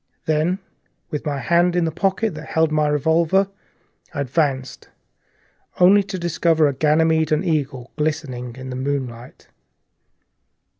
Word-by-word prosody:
Then, 160 +4 +1 0.5
with 150 0 -4
my 145 -1 -1
hand 175 +6 +2
in 175 -1 +2
the 160 - -1
pocket 195 +5 0
that - - -9
held 160 -4 +1
the 155 -1 +2
revolver, 165 +6 +2 0.7
I 145 - -1
advanced, 130 -2 -2 0.9
only 190 +3 +7
to 195 -1 -5
discover 165 -2 +2
a 140 - 0
Ganymede 160 +2 +2
and 155 +4 +1
Eagle, 140 -6 -2
glistening 145 -6 -3
in 130 0 -8
the - - -4
moonlight. 130 -3 -5
155 Hz, 135 wpm, -21 LUFS, 135-170 Hz, 0.9 s, only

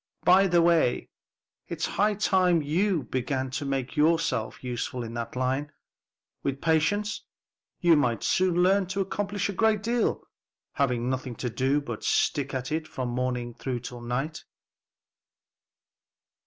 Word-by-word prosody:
By 190 +2 +6
the 175 -2 +4
way, 165 -7 +2 0.6
it's - - -2
high 210 +1 +1
time 185 -5 +3
you 170 +2 +1
began 130 +2 -2
to 145 +2 -3
make 135 0 -2
yourself 155 -8 +1
useful 125 0 -3
in 115 0 -7
that 115 0 -5
line. 130 +3 -1 0.7
With 135 0 -2
practice, 205 +7 +1 0.6
you 170 -2 +5
might 120 -7 +1
soon 180 -1 +2
learn 190 +1 +3
to 195 +2 -2
accomplish 200 +1 -2
a 200 - -3
great 215 0 +2
deal, 235 +1 0 0.5
having 125 -4 0
nothing 130 -1 -3
to 125 0 -4
do 135 +5 +1
but 145 - -6
stick 140 -2 +1
at 130 0 -4
it 155 0 -2
from 130 -5 -4
morning 125 -1 -2
to 125 +1 -2 0.2
night." 135 +6 -3
145 Hz, 140 wpm, -27 LUFS, 125-185 Hz, 0.7 s, By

